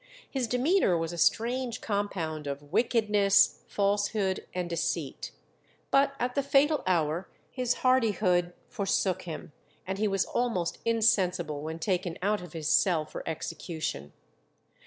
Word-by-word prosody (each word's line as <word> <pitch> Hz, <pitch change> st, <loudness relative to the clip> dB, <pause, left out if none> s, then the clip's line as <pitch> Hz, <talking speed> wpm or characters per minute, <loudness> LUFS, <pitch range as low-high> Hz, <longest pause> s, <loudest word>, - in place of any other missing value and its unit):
His 260 Hz, -4 st, -2 dB
demeanour 250 Hz, -, +2 dB
was 165 Hz, +1 st, -3 dB
a -, -, -6 dB
strange 240 Hz, +6 st, +1 dB
compound 175 Hz, -8 st, -3 dB
of 145 Hz, +2 st, -6 dB
wickedness, 210 Hz, -3 st, +3 dB
falsehood, 205 Hz, -1 st, 0 dB
and 180 Hz, -1 st, -3 dB
deceit. 170 Hz, -1 st, -3 dB, 0.6 s
But 275 Hz, 0 st, +4 dB
at 245 Hz, +1 st, -1 dB
the 280 Hz, -, +1 dB
fatal 280 Hz, +2 st, +3 dB
hour 170 Hz, 0 st, 0 dB, 0.2 s
his 250 Hz, -2 st, 0 dB
hardihood 200 Hz, -8 st, +3 dB
forsook 195 Hz, -2 st, 0 dB
him, 170 Hz, 0 st, -7 dB, 0.3 s
and 190 Hz, +2 st, -4 dB
he 215 Hz, -, +2 dB
was 195 Hz, -1 st, +1 dB
almost 225 Hz, -9 st, -1 dB
insensible 185 Hz, -9 st, +2 dB
when 160 Hz, +2 st, -5 dB
taken 180 Hz, 0 st, -1 dB
out 210 Hz, 0 st, +1 dB
of 180 Hz, -3 st, -10 dB
his 160 Hz, -2 st, -4 dB
cell 165 Hz, -2 st, +3 dB
for -, -, -7 dB
execution. 155 Hz, -, -4 dB
195 Hz, 135 wpm, -29 LUFS, 170-230 Hz, 0.6 s, But